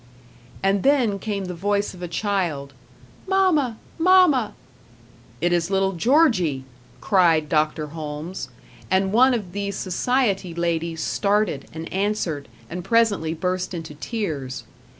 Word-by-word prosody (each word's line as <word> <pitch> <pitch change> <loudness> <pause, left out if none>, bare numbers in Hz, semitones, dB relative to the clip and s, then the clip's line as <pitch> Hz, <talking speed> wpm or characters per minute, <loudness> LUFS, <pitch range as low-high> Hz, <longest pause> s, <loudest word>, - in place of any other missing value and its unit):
And 195 0 +2
then 245 -7 +2
came 200 -2 -3
the 180 - -5
voice 200 +4 -1
of 180 - -12
a 175 - -3
child: 170 -7 -2 0.5
"Mamma! 350 - +2 0.2
Mamma!" 330 - +4 0.9
"It 175 +1 +2
is 170 0 +1
little 195 0 +2
Georgie!" 185 - +2 0.4
cried 170 -6 +3
Dr. 155 0 +1
Holmes; 155 +3 -6 0.4
and 190 +1 +1
one 255 +3 +5
of 200 -6 -5
the 200 +1 -3
society 195 -1 0
ladies 170 -1 -1
started, 200 -8 0
and 160 +1 -7
answered, 190 -7 -1 0.2
and 180 +1 -6
presently 200 -6 +2
burst 185 +1 -2
into 160 -3 -6
tears. 150 - -4
190 Hz, 125 wpm, -23 LUFS, 165-215 Hz, 0.9 s, one